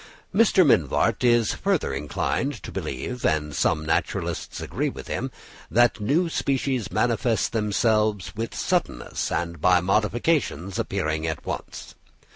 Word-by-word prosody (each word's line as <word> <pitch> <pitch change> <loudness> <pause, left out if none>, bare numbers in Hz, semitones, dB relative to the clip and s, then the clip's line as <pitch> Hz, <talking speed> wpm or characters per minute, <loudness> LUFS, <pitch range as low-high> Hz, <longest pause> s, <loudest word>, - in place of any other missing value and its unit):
Mr. 195 -5 +5
Mivart 85 - +2
is 120 -2 +4
further 195 - 0
inclined 75 - -1
to - - -7
believe, 125 -1 -4
and 75 -1 +1
some 75 +2 +1
naturalists 80 - -2
agree - - -2
with - - -9
him, - - -2 0.4
that 120 0 +3
new 145 - +2
species 135 -6 -1
manifest 120 -1 +1
themselves 105 -2 +1
"with 115 +2 -4
suddenness - - -1
and 85 -1 -2
by 90 +1 +5
modifications 105 - 0
appearing 80 +1 -1
at 80 - -4
once." - - -6
110 Hz, 125 wpm, -25 LUFS, 85-125 Hz, 0.4 s, Mr